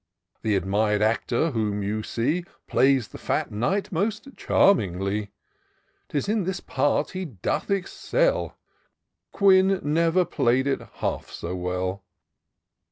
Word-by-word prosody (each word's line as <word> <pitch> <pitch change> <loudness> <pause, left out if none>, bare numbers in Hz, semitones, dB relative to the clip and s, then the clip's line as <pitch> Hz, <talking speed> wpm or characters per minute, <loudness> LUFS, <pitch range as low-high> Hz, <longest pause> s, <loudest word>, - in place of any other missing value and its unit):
Th' - - -6
admir'd 105 +3 +1
actor 120 +7 +1
whom 105 -4 -1
you 105 +2 -2
see 145 +11 -1 0.2
Plays 130 -3 +3
the - - -10
fat - - -1
Knight 125 - -1
most 215 +8 -1
charmingly: 100 - +2 0.8
'Tis 145 +3 -2
in 210 -1 +1
this 185 +1 -2
part 145 +2 0
he 185 0 -4
doth 110 - -3
excel; - - 0 0.7
Quin 190 -1 +4
never 165 +4 +2
play'd 125 -2 +1
it 140 - 0
half - - -3
so 90 +2 -5
well." 90 +2 -3
130 Hz, 120 wpm, -25 LUFS, -, 0.8 s, Quin